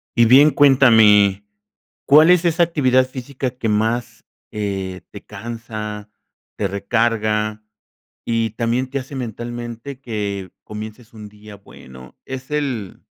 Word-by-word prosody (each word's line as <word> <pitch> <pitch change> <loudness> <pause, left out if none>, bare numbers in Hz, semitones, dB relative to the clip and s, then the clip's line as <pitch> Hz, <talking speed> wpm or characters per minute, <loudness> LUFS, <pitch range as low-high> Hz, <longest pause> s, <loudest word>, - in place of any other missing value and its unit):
Y 120 -1 +5
bien 140 +6 +7
cuéntame, 110 -8 +5 0.6
¿cuál 155 +4 +6
es 180 -1 +4
esa 170 +1 +3
actividad 130 -6 +2
física 130 0 -5
que 125 -3 -4
más, 115 +2 -1 0.3
eh, 95 -3 -4
te 100 - -10
cansa, 105 -1 -7 0.5
te - - -1
recarga 110 +1 -1 0.6
y 115 -1 -1
también 120 +4 -1
te 140 +1 -3
hace 135 +2 -9
mentalmente 120 +1 -6
que 100 -7 -5
comiences 110 +2 -9
un 105 -2 -10
día 105 0 -14
bueno? 65 -10 -15
Es 130 0 -7
el, 130 -10 -3
115 Hz, 125 wpm, -20 LUFS, 105-130 Hz, 0.6 s, bien